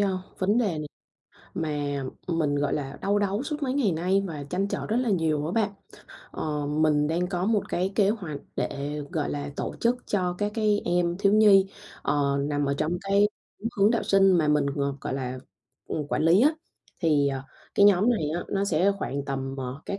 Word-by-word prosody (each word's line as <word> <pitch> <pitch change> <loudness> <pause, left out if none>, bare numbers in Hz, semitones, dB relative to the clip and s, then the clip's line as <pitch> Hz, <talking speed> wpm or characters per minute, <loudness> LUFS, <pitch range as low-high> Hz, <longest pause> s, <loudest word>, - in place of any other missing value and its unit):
ơ, 195 -2 +1 0.2
vấn 205 +5 +2
đề 240 - +2
này 150 -1 -5 0.7
mà, 145 -3 -2 0.2
ừm, 170 -2 -1
mình, 145 -3 +1
gọi 145 0 0
là, 140 -1 -4
đau 205 +1 +2
đáu 205 +3 0
suốt 300 0 -4
mấy 260 -2 0
ngày 240 -10 +2
nay 185 +5 +1
và 150 -5 -6
trăn 195 +2 0
trở - - -3
rất 220 - 0
là 250 -2 +1
nhiều 155 -5 +1
á 165 - -3
bạn. 215 -1 +1 0.6
Ờ, 150 -2 -3
mình 150 0 +2
đang 170 +3 0
có 180 +1 -2
một 215 -3 +1
cái 185 +3 -1
kế 200 -2 +4
hoạch 175 -10 -4 0.2
để, 145 +2 -3
gọi 155 -5 -1
là, 145 0 -4
tổ - - -3
chức 235 +1 +2
cho 180 -3 0
các 205 0 -1
cái 215 -2 +2
em 175 0 +1
thiếu 200 0 +3
nhi, 205 -3 +6 0.4
ờ, 140 -1 +1
nằm 145 0 0
ở 140 0 0
trong 155 - 0
cái 200 +1 +3 0.5
hướng 200 +2 +5
đạo 235 - +1
sinh 195 -1 +4
mà 165 -4 +3
mình, 150 -1 +3
ờ, 140 -1 0
gọi - - -3
là, 130 -1 -4 0.5
ừm, 150 -2 -3
quản - - 0
lý 170 +6 +5
á. 300 +4 +5 0.5
Thì, 150 -5 +3
ờ, 135 -1 -3 0.3
cái 200 - +6
nhóm 205 +3 +5
này 160 -11 0
á, 175 - -3
nó 195 0 0
sẽ 185 +1 +2
khoảng 140 -6 -3
tầm, 135 -1 -3
ờ, 130 +2 -5
các 200 - -3
175 Hz, 215 wpm, -26 LUFS, 145-200 Hz, 0.7 s, nhi